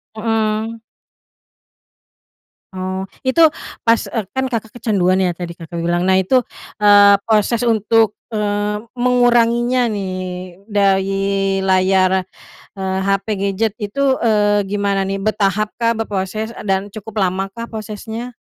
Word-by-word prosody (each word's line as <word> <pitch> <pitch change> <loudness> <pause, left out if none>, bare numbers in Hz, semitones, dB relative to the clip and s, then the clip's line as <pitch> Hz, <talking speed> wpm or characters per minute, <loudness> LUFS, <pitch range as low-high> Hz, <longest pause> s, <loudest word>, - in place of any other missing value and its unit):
Mmm. 220 0 -1 1.9
Oh, 185 0 -3 0.2
itu 325 +6 +4 0.4
pas 230 0 +4
eee, 225 -3 -2
kan 265 0 -1
Kakak 225 -4 -4
kecanduan 195 -6 +1
ya 180 -2 +1
tadi 175 0 -6
Kakak 165 +1 -9
bilang. 175 +1 0
Nah 190 - +4
itu, 190 +8 +3 0.4
eee, 205 -1 +7
proses 225 +2 +2
untuk, 225 -1 +2 0.2
eee, 210 -1 -1 0.2
menguranginya 245 0 +2
nih 195 -3 -3 0.6
dari 195 -1 +2 0.6
layar, 185 0 +3 0.5
eee, 190 -1 -2
HP, 195 +1 0
gadget 200 +2 0
itu, 260 +6 0
eee, 205 -2 +2
gimana 200 -1 0
ni, 195 - -2
bertahap 210 0 0
kah 230 -1 +2
berproses, 215 0 -3
eee, 230 - -10
dan 190 -1 +2
cukup 215 0 -4
lama 190 +1 0
kah 230 0 -7
prosesnya? 220 +2 -6
210 Hz, 125 wpm, -18 LUFS, 195-225 Hz, 1.9 s, eee